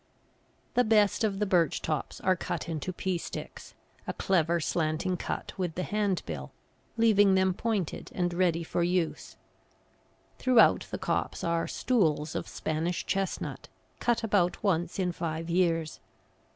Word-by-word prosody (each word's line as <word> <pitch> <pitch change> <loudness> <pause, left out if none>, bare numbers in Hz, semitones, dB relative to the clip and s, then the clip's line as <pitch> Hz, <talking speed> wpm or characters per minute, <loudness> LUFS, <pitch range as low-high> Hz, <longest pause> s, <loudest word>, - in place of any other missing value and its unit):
The 245 - +4
best 215 -2 +3
of 205 -3 +1
the 210 - +1
birch 180 -4 +2
tops 155 -3 -3
are 185 0 +3
cut 180 - -4
into 165 +2 -3
pea 185 0 -2
sticks, - - -8 0.3
a - - -2
clever, 170 -2 +1
slanting 165 +3 0
cut - - -4
with 175 -4 -2
the 180 - -2
hand 205 -4 0
bill 70 -5 -6 0.5
leaving 205 -4 +5
them 190 0 +3
pointed 205 -4 -2
and 175 -1 0
ready 170 -2 +1
for 170 - -2
use. 175 -1 -1 1.0
Throughout 255 -3 +5
the - - -3
copse - - -2
are 170 0 0
"stools" 160 -11 +1
of - - -3
Spanish 160 +3 -2
chestnut, 195 -1 -2 0.3
cut 240 -1 +1
about 200 -3 +1
once 175 -4 0
in 185 -2 0
five 165 0 -4
years. 165 -3 +1
180 Hz, 145 wpm, -29 LUFS, 165-195 Hz, 1.0 s, leaving